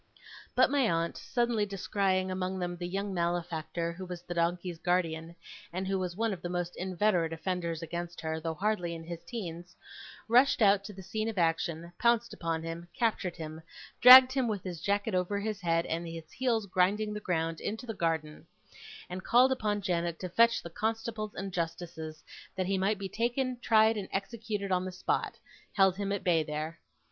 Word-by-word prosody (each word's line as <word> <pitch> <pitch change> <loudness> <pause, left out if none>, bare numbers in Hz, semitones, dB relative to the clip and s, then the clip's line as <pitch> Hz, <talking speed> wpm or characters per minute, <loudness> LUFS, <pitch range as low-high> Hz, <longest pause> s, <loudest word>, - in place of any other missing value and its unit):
But - - +5
my 275 -5 +3
aunt, 165 0 0
suddenly 240 -3 0
descrying 195 -1 0
among 185 0 -2
them 175 -1 -3
the 175 0 -5
young 195 +2 -3
malefactor 170 -1 -2
who 185 +3 -8
was 180 -1 -7
the 175 - -5
donkey's 170 0 -1
guardian, 170 -2 -1 0.4
and 185 +2 -3
who 195 0 0
was 180 -2 -3
one 225 +1 0
of 180 - -7
the 175 - -4
most 175 0 -3
inveterate 185 -2 +1
offenders 170 -1 -3
against 170 +1 -5
her, 160 0 -2
though 160 0 -3
hardly 180 -2 -1
in 165 - -8
his 170 0 -7
teens, 175 -6 -7 0.5
rushed 250 +4 +5
out 200 -2 +5
to 210 - -7
the 190 0 -10
scene 215 +4 -2
of 220 - -6
action, 170 0 0
pounced 235 0 +2
upon 165 -1 -2
him, 165 +1 -6
captured 215 -7 0
him, 160 -1 -7 0.4
dragged 255 +1 +11
him, 260 -2 +1
with 205 -4 -2
his 175 -4 -6
jacket 200 +2 0
over 185 +2 0
his 210 -1 -3
head, 165 -1 +1
and 170 +1 -3
his 165 -1 -8
heels 235 -4 0
grinding 200 +3 +1
the 210 - -4
ground, 165 -4 -1
into 220 +4 -4
the 225 - -4
garden, 160 -5 -2 0.6
and, 185 +1 -6
calling 250 +2 +5
upon 210 -5 0
Janet 170 -2 -1
to 185 - -4
fetch 230 +6 +4
the 170 - -8
constables 220 +1 -3
and 195 -1 -5
justices, 165 -2 -4 0.3
that 185 - -1
he 195 +2 0
might 200 +3 +1
be 195 0 -4
taken, 245 +4 -1
tried, 220 -1 +4
and 195 -2 -5
executed 205 0 -3
on 180 0 +2
the 185 - -4
spot, 185 - -2 0.4
held 190 -2 +4
him 200 -1 -2
at 200 - -2
bay 170 -3 +3
there. 155 +2 -4
185 Hz, 190 wpm, -30 LUFS, 170-210 Hz, 0.6 s, dragged